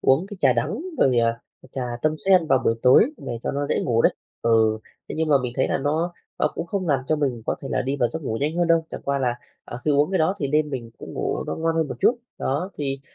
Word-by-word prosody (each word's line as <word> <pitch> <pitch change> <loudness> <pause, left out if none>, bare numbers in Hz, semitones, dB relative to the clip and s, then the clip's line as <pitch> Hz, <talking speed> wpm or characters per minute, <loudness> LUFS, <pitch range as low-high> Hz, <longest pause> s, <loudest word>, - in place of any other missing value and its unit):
uống 135 +8 +3
cái 205 0 -9
trà 135 -3 +5
đắng 120 - -1 0.2
rồi, 125 - +4
à, 115 0 +1 0.3
trà 130 - -3 0.2
tâm 155 0 +2
sen 185 -4 +5
vào 135 -3 +4
buổi 115 - +3
tối 135 - +6
để 120 -3 -5
cho - - -1
nó 145 +1 -1
dễ - - +1
ngủ 115 -3 +2
đấy. - - +5 0.3
Ừ, 110 -1 +3 0.3
thế - - -5
nhưng 160 -1 +1
mà 145 - +6
mình 125 -1 -3
thấy 130 - +2
là - - 0
nó 155 +5 0 0.3
nó 150 - +3
cũng - - -4
không 185 0 -2
làm 140 -3 +2
cho 155 - +2
mình 130 -6 -1
có - - +1
thể 135 - -5
là - - 0
đi 135 +2 -2
vào 120 -4 +2
giấc 160 - -6
ngủ 110 -5 -2
nhanh 150 +4 -1
hơn 175 0 +2
đâu, 165 -1 +3
chẳng - - -7
qua 140 0 0
là, 125 -3 0 0.3
à, 120 - -7
khi 155 - +2
uống 145 +3 +3
cái 190 - +1
đó 160 +5 +2
thì 140 - -1
đêm 150 +1 +1
mình 120 -4 -5
cũng - - -9
ngủ - - -2
nó - - -3
ngon 165 0 0
hơn 160 -2 +1
một - - -5
chút. 240 - +3 0.2
Đó, 150 +8 -1
thì 135 -2 -2
140 Hz, 285 wpm, -23 LUFS, 125-160 Hz, 0.3 s, tối